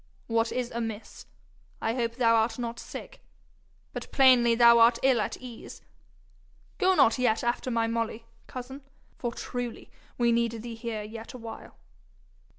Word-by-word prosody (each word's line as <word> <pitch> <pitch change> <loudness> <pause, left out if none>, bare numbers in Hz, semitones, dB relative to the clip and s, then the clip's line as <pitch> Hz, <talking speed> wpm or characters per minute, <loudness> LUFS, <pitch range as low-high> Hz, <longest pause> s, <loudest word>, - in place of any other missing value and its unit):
What 230 0 0
is 250 -1 -2
amiss? 225 -2 -6 0.5
I 225 - -1
hope 235 -2 -2
thou 235 -2 +3
art 225 0 +2
not 235 -1 -4
sick - - -9 0.7
but - - -7
plainly 250 -3 +5
thou 235 0 +7
art 230 +1 +6
ill 260 -4 +4
at - - -3
ease! 245 -3 -10 1.0
Go 375 -1 +4
not 270 -6 +4
yet 235 -3 +2
after 240 +2 -1
my 230 -2 +1
Molly, 230 0 -2 0.2
cousin, 260 +2 -8 0.4
for 240 - -2
truly 245 0 -6 0.3
we 235 -1 +3
need 230 -1 0
thee 235 -1 -6
here 225 -2 -5
yet 225 +1 -9
a - - -7
while.' 230 -2 -10
235 Hz, 155 wpm, -28 LUFS, 230-245 Hz, 1.0 s, thou